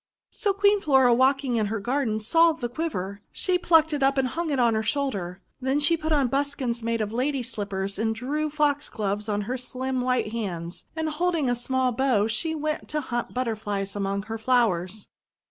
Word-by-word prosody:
So 410 - 0
Queen 405 +1 +3
Flora, 265 -6 +5
walking 260 0 +2
in 215 -2 +1
her 220 +1 -2
garden, 240 -1 0
saw 330 +9 +4
the 270 -6 -4
quiver. 205 - -4
She 365 -1 0
plucked 320 -3 +4
it 290 - -1
and 270 -1 +2
hung 335 +2 -3
it 280 - 0
on 235 -2 +3
her 220 - +1
shoulder. 210 -8 -2 0.2
Then 265 +3 +1
she 295 +3 +3
put 315 0 -4
on 290 -3 +3
buskins 270 -3 -1
made 230 0 -1
of 215 0 -3
Lady's 255 0 -1
slippers, 195 -1 -3
and 220 0 0
drew 295 +7 -2
Foxgloves 280 -9 -1
on 205 0 0
her 250 +5 -3
slim 255 +1 -3
white 250 -4 0
hands; 175 -7 -5
and, 320 -1 -1
holding 310 -3 0
a - - +1
small 255 +1 0
bow, 240 -4 +2
she 230 +9 -1
went 305 0 -3
to 300 - 0
hunt 240 -3 -4
Butterflies 210 -5 -2
among 200 0 -1
her 225 +2 -5
flowers. 215 -5 +1
250 Hz, 190 wpm, -26 LUFS, 215-290 Hz, 0.2 s, Flora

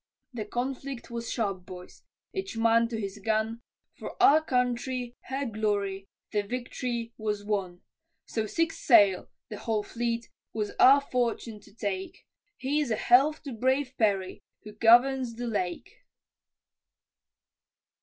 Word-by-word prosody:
The 220 -3 -4
conflict 260 0 -4
was 235 0 -4
sharp, 195 -6 -2
boys, 180 0 -11 0.3
each 385 -9 -4
man 230 +1 +4
to 230 -1 -4
his 200 -1 -5
gun, 220 +2 -1 0.4
For - - -7
our 310 +2 +6
country, 250 -2 -1
her 270 +1 -3
glory, 205 -3 -2 0.2
the 210 - +1
vict'ry 240 +1 -4
was 210 -1 -2
won, 190 -4 -2 0.4
So 220 -1 -2
six 330 +7 -1
sail 205 -7 +5 0.2
(the 210 - -7
whole 220 -2 -1
fleet) 235 +1 -3 0.3
was 210 -2 -2
our 275 +2 +8
fortune 235 -4 -2
to 205 - -19
take, 195 -4 -4 0.3
Here's 285 +1 0
a 220 - +1
health 275 +8 +4
to 275 -4 -6
brave 260 +3 0
Perry, 195 -4 +1 0.2
who 210 - -9
governs 240 +3 +4
the 245 +1 -5
Lake. 220 - -3
230 Hz, 135 wpm, -28 LUFS, 210-255 Hz, 0.4 s, our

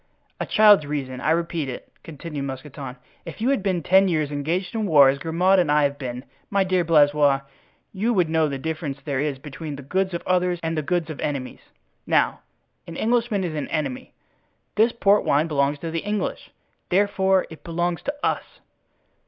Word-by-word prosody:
"A - - -3
child's 205 -8 +6
reason—I 135 -2 -3
repeat 165 -3 0
it," 125 - -8
continued 150 -2 -6
Mousqueton. 135 -1 -7 0.3
"If 165 - -9
you 235 +4 +1
had 275 - +1
been 185 -4 -1
ten 190 +2 +5
years 155 -4 0
engaged 165 +8 -2
in 220 -2 -1
war, 145 -5 +7
as 140 +1 0
Grimaud 180 +5 +2
and 170 -5 +2
I 150 0 +4
have 140 0 0
been, 125 -1 -5 0.2
my 200 -1 +2
dear 185 -1 +1
Blaisois, 145 -3 +4 0.5
you 210 +5 0
would 180 -7 +2
know 160 -1 +2
the 140 - -3
difference 155 -1 -4
there 140 -3 -1
is 145 -1 -1
between 150 +2 -7
the 140 - -9
goods 185 +5 -1
of 170 - -5
others 180 -1 +1
and 165 0 -1
the 155 - 0
goods 165 +1 -1
of 155 - -8
enemies. 140 -3 -4 0.5
Now - - +2 0.5
an 165 - -8
Englishman 230 -3 +1
is 170 -3 -3
an 150 -2 -3
enemy; 140 -5 -4 0.6
this 220 +3 +3
port 205 -3 +3
wine 145 +3 +2
belongs 145 -1 +1
to 165 - -4
the 165 - -1
English, 210 +3 -3 0.4
therefore 190 0 +2
it 160 - -12
belongs 175 0 -2
to 285 - -3
us." - - -2
160 Hz, 185 wpm, -23 LUFS, 145-185 Hz, 0.6 s, war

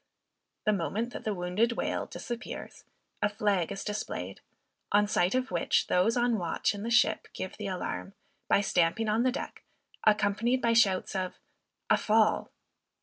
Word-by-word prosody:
The 215 - +4
moment 215 +6 -2
that - - -7
the 215 - 0
wounded 180 +7 +1
whale - - -2
disappears, 240 -1 -7 0.4
a 205 - +3
flag 205 -4 0
is 195 - -4
displayed; 95 - -4 0.5
on 205 0 +5
sight 185 0 +1
of 255 0 -1
which, 170 -2 +2
those 185 +7 +2
on 240 -2 +2
watch 170 +3 0
in 200 - -6
the 230 - -3
ship, 240 +1 +3
give 185 0 -5
the 210 - -4
alarm, 90 - -4 0.3
by - - +4
stamping 185 +3 +1
on 215 +2 +2
the 255 +1 +3
deck, 260 - -6 0.4
accompanied 215 +4 +2
by 235 -2 +2
shouts 195 -4 +3
of 185 -1 -2 0.6
"a - - +6
fall." 215 0 +2
210 Hz, 160 wpm, -29 LUFS, 185-230 Hz, 0.6 s, a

